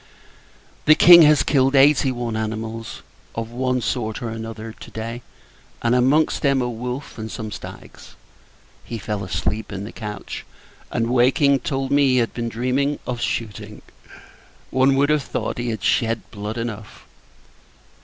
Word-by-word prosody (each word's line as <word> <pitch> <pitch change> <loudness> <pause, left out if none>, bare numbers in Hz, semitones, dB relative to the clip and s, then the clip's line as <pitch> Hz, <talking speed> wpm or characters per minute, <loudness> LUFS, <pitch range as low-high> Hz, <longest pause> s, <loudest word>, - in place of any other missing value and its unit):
The 155 - +7
King 170 +1 +9
has 150 -1 +4
killed 135 -1 +2
eighty 135 -1 +5
one 120 -2 -3
animals, 110 +1 -5 0.3
of 115 0 -4
one 125 +1 -1
sort 110 -3 -2
or 115 - -3
other, 115 0 -6
to - - -12
day; 115 +2 -6 0.6
and, 115 0 +2
amongst 135 +5 +3
them, 135 -2 +2
a 125 - 0
wolf, 125 +2 -6
and 110 0 -5
some 110 -1 -6
stags. - - -10 0.7
He 115 - -6
fell 105 -2 -4
asleep 105 +4 -2
in 100 0 -5
the 105 - -7
coach; 105 -3 -7 0.5
and, 115 0 -1
waking, 135 +3 +4
told 135 -1 -3
me 140 0 +4
he - - +3
had 115 -2 +1
been 115 -1 -3
dreaming 130 +5 0
of 120 -2 -4
shooting. 105 -2 -4 0.9
One 130 +1 +3
would 140 +2 +3
have 150 -1 +2
thought, 120 - -4
he 120 0 -2
had 110 -4 -4
shed 115 -1 +1
blood 105 +2 -5
enough. 110 -2 -6
120 Hz, 155 wpm, -22 LUFS, 110-135 Hz, 0.9 s, King